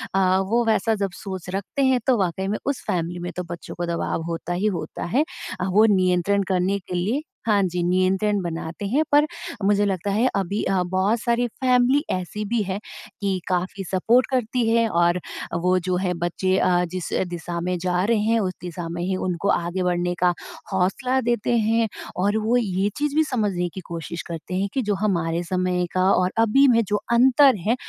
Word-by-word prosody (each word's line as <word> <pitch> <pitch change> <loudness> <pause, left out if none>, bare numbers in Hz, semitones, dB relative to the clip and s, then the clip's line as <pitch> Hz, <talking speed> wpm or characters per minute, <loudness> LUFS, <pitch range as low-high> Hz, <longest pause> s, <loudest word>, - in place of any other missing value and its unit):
अ, 190 -1 +3
वो 235 +2 +3
वैसा 225 0 +2
जब 200 -2 -2
सोच 190 -2 -7
रखते 200 +8 -2
हैं 260 -1 +3
तो 255 -2 +4
वाक़ई 190 -1 -1
में 210 +2 -1
उस 280 -1 -2
फ़ैमिली 175 0 -2
में 175 0 -5
तो 180 - -3
बच्चों 170 - -7
को 175 - -3
दबाव 170 -1 -2
होता 170 +1 -3
ही 190 +4 0
होता - - -6
है। 290 - +5 0.4
अ, 180 - -1
वो 210 +4 +5
नियंत्रण 185 +2 +2
करने 190 +1 +1
के 180 -1 -7
लिए 210 +11 0 0.3
हाँ 205 -2 +4
जी। 180 -1 -1
नियंत्रण 190 +3 +1
बनाते 170 +2 -5
हैं 280 +9 +2
पर 290 +1 +6 0.4
मुझे 205 0 +3
लगता 195 0 -1
है 220 +6 +2
अभी 195 +1 -1
अ, 190 -2 +1
बहुत 190 +5 +1
सारी 235 +1 +1
फ़ैमिली 255 +3 +2
ऐसी 185 +3 -3
भी 230 +2 0
है 190 0 -3 0.4
कि 195 -2 0
काफ़ी 185 +2 -2
सपोर्ट 230 +7 +3
करती 245 -1 0
है 230 0 +3
और 175 0 +2
अ, 165 0 -7
वो 180 0 +3
जो 185 - +1
है 180 -1 0
बच्चे 185 +2 0
अ, 180 -1 +3
जिस 185 -2 -4
अ, - - +1
दिशा 170 0 -4
में 180 +1 -1
जा 180 0 0
रहे 230 +1 +2
हैं 225 +2 +2
उस 185 -4 -1
दिशा 175 -1 -5
में 170 +1 -4
ही 185 +1 -1
उनको 180 +2 -2
आगे 175 +2 -1
बढ़ने 175 0 0
का 180 0 +3 0.4
हौंसला 195 +8 +1
देते 240 0 0
हैं। 225 +1 +2 0.3
और 205 +4 +1
वो 220 +3 +2
ये 200 -4 0
चीज़ 295 0 -1
भी 315 - +5
समझने 205 - -1
की 190 - -6
कोशिश 170 0 -5
करते 170 +2 -6
हैं 195 +2 0
कि 265 - 0
जो - - +2
हमारे 170 -4 0
समय 180 0 0
का 185 - +2
और 185 0 +2
अभी 230 +5 +5
में 230 -3 +5
जो 205 - +1 0.2
अंतर 260 +2 +6
है, 230 - +4
190 Hz, 205 wpm, -23 LUFS, 180-225 Hz, 0.4 s, पर